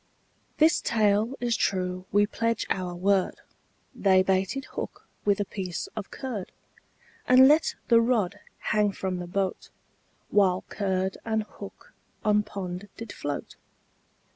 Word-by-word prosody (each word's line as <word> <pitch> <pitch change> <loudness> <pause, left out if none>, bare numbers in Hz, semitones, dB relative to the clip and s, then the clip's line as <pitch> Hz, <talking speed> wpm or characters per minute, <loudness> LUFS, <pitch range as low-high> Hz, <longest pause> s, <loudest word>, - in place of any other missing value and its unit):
This 315 +2 +4
tale 215 +2 +2
is 240 -1 +1
true 185 -2 -1
we 205 +1 +4
pledge 230 +1 -1
our 180 -2 -2
word, 190 +1 +2 0.6
They 190 -2 +4
baited 190 +8 0
hook - - -6 0.2
with 205 0 +3
a 205 - 0
piece 185 -3 -4
of 215 -3 -5
curd, 235 -9 -5 0.8
And 255 +1 +8
let 305 +3 +4
the 230 -1 +6
rod 230 -6 +1 0.3
hang 210 -1 +2
from 190 -1 -3
the 175 - -5
boat, 190 +1 -2 0.6
While 190 -3 +3
curd 190 -1 -1
and 220 -1 0
hook 200 -1 -12 0.3
on 210 0 +4
pond 195 -2 -6
did 230 -2 -7
float. 145 -1 -5
200 Hz, 135 wpm, -27 LUFS, 185-225 Hz, 0.8 s, And